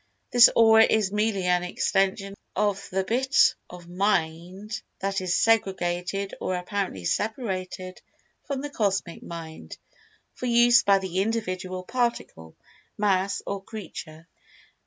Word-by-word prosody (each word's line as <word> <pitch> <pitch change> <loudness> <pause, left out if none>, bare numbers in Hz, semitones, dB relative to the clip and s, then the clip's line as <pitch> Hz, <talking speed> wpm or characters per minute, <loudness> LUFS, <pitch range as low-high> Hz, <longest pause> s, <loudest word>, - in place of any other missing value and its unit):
This 245 -1 +8
Aura 225 -1 +7
is 215 -3 +2
merely 210 -2 0
an 180 0 +2
extension 195 +2 0 0.2
of 200 0 -1
the 190 +1 -1
bit 260 +7 +3 0.2
of 175 -1 -12
Mind 185 +3 -2 0.2
that 195 0 -2
is 180 -1 0
segregated 195 -3 0
or 185 - -1
apparently 180 - -4
separated 185 - -3 0.5
from 280 -3 -3
the 290 0 -6
Cosmic 195 -7 -1
Mind, 160 - -9 0.6
for 250 - -5
use 240 0 +5
by 200 -1 +4
the 190 -1 -3
individual 185 -4 -3
Particle, 235 - -3 0.4
Mass, 195 -1 0
or 200 -1 -4
Creature. 165 -6 -9
195 Hz, 120 wpm, -25 LUFS, 180-220 Hz, 0.6 s, This